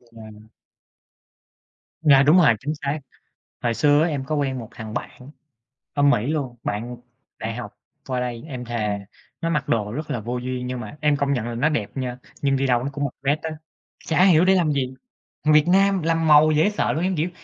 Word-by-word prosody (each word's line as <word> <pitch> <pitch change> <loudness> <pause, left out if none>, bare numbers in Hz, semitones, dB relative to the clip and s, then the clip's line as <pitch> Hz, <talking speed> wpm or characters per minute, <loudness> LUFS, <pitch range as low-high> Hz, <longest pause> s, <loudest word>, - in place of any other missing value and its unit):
Dạ. 110 -2 -15 1.5
Dạ, 140 -4 +6
đúng 150 +5 +5
rồi, 155 -10 +6
chính 150 +3 -3
xác. 145 0 -3 0.6
Hồi 120 -1 +1
xưa 145 +3 +4
á 165 - +2
em 140 -4 -3
có 155 - -2
quen 135 -3 -1
một 115 - -8
thằng 110 -1 -8
bạn 130 +3 -7 0.6
ở 145 - +1
Mỹ 140 -5 +3
luôn, 140 -5 -2
bạn 115 +4 -4 0.4
đại 110 +1 -4
học 105 -4 -7 0.3
qua 130 -2 -2
đây, 120 -2 -4
em 125 -4 -6
thề 110 -4 -2 0.4
nó 165 - -1
mặc 150 -3 -1
đồ 105 -2 0
rất 150 +5 -5
là 125 -6 -2
vô 120 +3 -3
duyên 125 0 -4
nhưng 125 0 -4
mà 110 +5 -8
em 150 -1 +2
công 140 0 0
nhận 120 -4 -1
là 120 - -4
nó 130 +6 +2
đẹp 115 -10 -2
nha. 125 -2 -3 0.2
Nhưng 135 -1 +2
đi 135 0 0
đâu 125 -1 +1
nó 140 - -2
cũng 145 +1 -3
mặc 135 - -4
vest 145 +3 +1
á, 160 - -3 0.6
chả 165 +3 +3
hiểu 180 -3 +5
để 190 - +5
làm 170 -5 +2
gì, 130 -2 -2 0.5
thằng 155 - +4
Việt 150 -1 +6
Nam 195 0 +3
làm 165 0 +1
màu 150 +1 +7
dễ 155 +7 +3
sợ 210 - 0
luôn, 160 +3 -1
em, 185 0 0
kiểu, 160 +4 -1
140 Hz, 220 wpm, -23 LUFS, 120-155 Hz, 1.5 s, màu